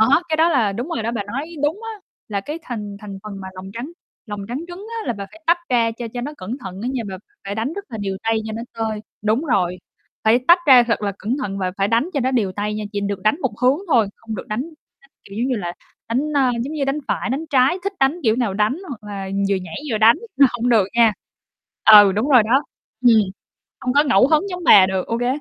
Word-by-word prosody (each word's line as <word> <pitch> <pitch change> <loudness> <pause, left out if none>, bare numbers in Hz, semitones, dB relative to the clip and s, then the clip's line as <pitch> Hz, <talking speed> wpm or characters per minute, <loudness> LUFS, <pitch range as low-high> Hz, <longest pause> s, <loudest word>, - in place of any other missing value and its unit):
Đó, 265 +9 +5
cái 315 - +1
đó 325 +2 +4
là 235 -11 +2
đúng 240 +9 -4
rồi 235 -10 -3
đó, 230 - -1
bà 230 -3 -2
nói 275 +10 -5
đúng 310 +8 0
á, 425 - -12 0.3
là 200 -2 -2
cái 295 +10 -6
thành 210 -6 -6
thành 200 -2 -8
phần 205 -2 -8
mà 190 - -7
lòng 185 +1 -9
trắng 240 +8 -6 0.4
lòng 205 -2 -5
trắng 245 +3 -3
trứng 360 +4 -9
á - - -8
là - - 0
bà 200 -3 -7
phải 325 - -16
tách 340 +1 +4
ra 235 -2 +3
cho 240 - -4
cho 245 - -3
nó 285 +5 -5
cẩn 220 +8 -5
thận 190 -6 -8
á 245 - -2
nha, 255 - -2
bà 190 - -5 0.3
phải 200 - -4
đánh 225 +7 -2
rất 400 +3 -6
là 230 -4 -7
đều 195 -1 -3
tay 225 0 +1
cho 220 - -5
nó 225 +1 -5 0.2
tơi 220 -1 -2 0.2
đúng 220 +7 +1
rồi, 180 - +1 0.5
phải 220 +2 +5
tách 345 +2 +8
ra 260 -3 +8
thật 230 -2 -1
là 200 -1 -1
cẩn 230 +5 -2
thận 195 -3 -4
và 185 -1 -1
phải 195 0 +1
đánh 230 +8 +1
cho 280 - +1
nó 260 +1 +1
đều 220 -7 0
tay 205 +2 -3
nha, 215 0 -4
chỉ 205 - -2
được 200 -1 -3
đánh 215 +7 +3
một 260 -8 -1
hướng 255 +4 +3
thôi, 230 -9 +3
không 225 -1 -7
được 200 - -7
đánh 215 +3 -2 0.4
nó, - - -21 0.2
kiểu 195 - -12
giống 240 - 0
như 255 - 0
là, 175 -5 -4 0.4
đánh, 230 +3 +1
ơ, 270 -3 +3
giống 275 +5 -5
như, 290 -3 -1
đánh 275 +2 -1
phải, - - -1
đánh 275 +5 -2
trái, 270 +6 +3
thích 400 - -1
đánh 275 +6 +2
kiểu 220 -3 +2
nào 235 -6 -1
đánh, 210 +6 +1
hoặc 245 -7 -8
là 195 -1 -5 0.2
vừa 200 - +2
nhảy 180 -3 -7 0.2
vừa 215 - 0
đánh 225 +2 +6 0.2
là 275 - +7
hông 240 0 -1
được 225 -5 +4
nha. 230 -2 +5 0.8
Ừ, 205 -2 +9
đúng 215 +8 -1
rồi 255 -5 +7
đó, 250 +6 +2 0.4
ừm. 235 -2 +7 0.6
Không 250 - -1
có 285 +2 +5
ngẫu 255 -5 +4
hứng 315 +6 +2
giống 360 -1 -5
bà 195 - +8
được, 190 -1 -2
ô 230 - -2
kê 245 - -1
230 Hz, 265 wpm, -21 LUFS, 205-270 Hz, 0.8 s, Ừ